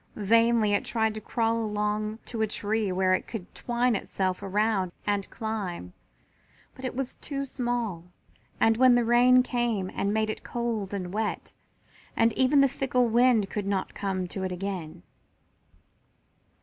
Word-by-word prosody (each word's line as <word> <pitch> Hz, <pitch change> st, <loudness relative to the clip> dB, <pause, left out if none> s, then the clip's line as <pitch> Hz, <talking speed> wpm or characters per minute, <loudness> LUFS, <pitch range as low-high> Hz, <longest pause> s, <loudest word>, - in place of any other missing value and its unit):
Vainly 225 Hz, 0 st, +3 dB
it 205 Hz, -, +1 dB
tried 220 Hz, -2 st, 0 dB
to 215 Hz, -, -7 dB
crawl 225 Hz, +1 st, 0 dB
along 210 Hz, 0 st, -1 dB
to 230 Hz, -2 st, -4 dB
a 220 Hz, -, +2 dB
tree 210 Hz, -1 st, -1 dB
where 185 Hz, 0 st, +2 dB
it -, -, -1 dB
could 200 Hz, -5 st, -7 dB
twine 240 Hz, 0 st, 0 dB
itself 185 Hz, -1 st, -2 dB
around 200 Hz, -1 st, 0 dB
and 205 Hz, -1 st, -1 dB
climb, 200 Hz, -, -5 dB, 0.8 s
but 260 Hz, -, -13 dB
it 255 Hz, -, -3 dB
was 265 Hz, -1 st, -2 dB
too 275 Hz, -1 st, -5 dB
small, 240 Hz, -9 st, -2 dB, 0.5 s
and 225 Hz, 0 st, +4 dB
then 255 Hz, 0 st, +6 dB
the 240 Hz, -1 st, +2 dB
rain 250 Hz, +2 st, +5 dB
came 235 Hz, -7 st, -1 dB
and 200 Hz, -, -1 dB
made 220 Hz, 0 st, +1 dB
it -, -, -8 dB
cold 230 Hz, -5 st, -3 dB
and 185 Hz, -3 st, -4 dB
wet, 215 Hz, 0 st, -3 dB, 0.6 s
and 230 Hz, 0 st, +3 dB
even 270 Hz, +2 st, +4 dB
the 275 Hz, -, +6 dB
fickle 255 Hz, -2 st, 0 dB
wind 235 Hz, -3 st, +4 dB
did 205 Hz, -2 st, -3 dB
not 195 Hz, -2 st, -1 dB
come 190 Hz, -2 st, -2 dB
to 195 Hz, -, -5 dB
it 185 Hz, -, -2 dB
again. 180 Hz, -3 st, -5 dB
220 Hz, 160 wpm, -27 LUFS, 195-240 Hz, 0.8 s, then